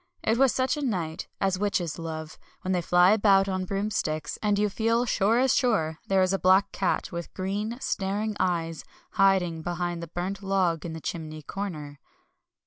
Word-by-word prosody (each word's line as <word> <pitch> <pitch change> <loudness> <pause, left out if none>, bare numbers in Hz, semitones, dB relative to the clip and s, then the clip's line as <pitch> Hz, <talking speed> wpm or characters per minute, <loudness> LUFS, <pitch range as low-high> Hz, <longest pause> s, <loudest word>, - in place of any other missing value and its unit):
It 225 +2 +1
was 270 -2 +5
such 260 +4 0
a - - -3
night 180 - -2
as 190 -1 0
witches 185 -6 -1
love, 160 -1 -6 0.2
when 185 - -1
they 180 -1 +1
fly 180 +2 +5
about 200 -2 +4
on 185 -1 -2
broomsticks, 195 -6 -2
and 210 -1 +2
you 210 +1 +2
feel 230 +4 +1
sure 220 0 +2
as 260 0 +3
sure 160 - +1
there 190 -1 +3
is 185 +1 +1
a 195 - 0
black 190 +2 +4
cat 190 - -1
with 170 -1 -6
green, 205 +5 -3
staring 205 -1 -2
eyes, 165 -3 -1 0.3
hiding 190 -5 +2
behind 175 0 -3
the 170 - -6
burnt 180 +4 -4
log 185 -4 0
in 165 - -6
the 160 - -7
chimney 155 -2 -5
corner. 150 -6 -6
190 Hz, 180 wpm, -27 LUFS, 170-205 Hz, 0.3 s, was